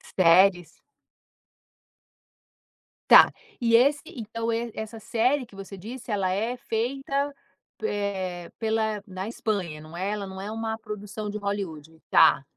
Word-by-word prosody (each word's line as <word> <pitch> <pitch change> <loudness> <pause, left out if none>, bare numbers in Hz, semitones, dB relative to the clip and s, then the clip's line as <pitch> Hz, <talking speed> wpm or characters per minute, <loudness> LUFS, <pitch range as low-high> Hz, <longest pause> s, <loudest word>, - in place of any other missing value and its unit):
Séries? 180 -1 +4 2.3
Tá. - - +9 0.3
E 230 -2 +3
esse 280 +5 +4
então 230 -1 -4
e 230 +1 -2
essa 220 +1 -6
série 250 +5 +1
que 215 -4 -18
você 195 0 -9
disse, 230 +5 -8
ela 190 -3 +1
é 225 +6 -1
feita, 270 +5 -2 0.5
eh, 190 - -2
pela 220 -2 0
na 190 0 -6
Espanha? 195 -9 -3
Não 155 +2 -12
é, 190 +4 -2
ela 210 -1 -3
não 190 0 -8
é 200 +2 -5
uma 225 0 -3
produção 210 0 -6
de 210 - -4
Hollywood? 165 -6 -5
Tá. 160 -4 +6
210 Hz, 135 wpm, -26 LUFS, 190-230 Hz, 2.3 s, Tá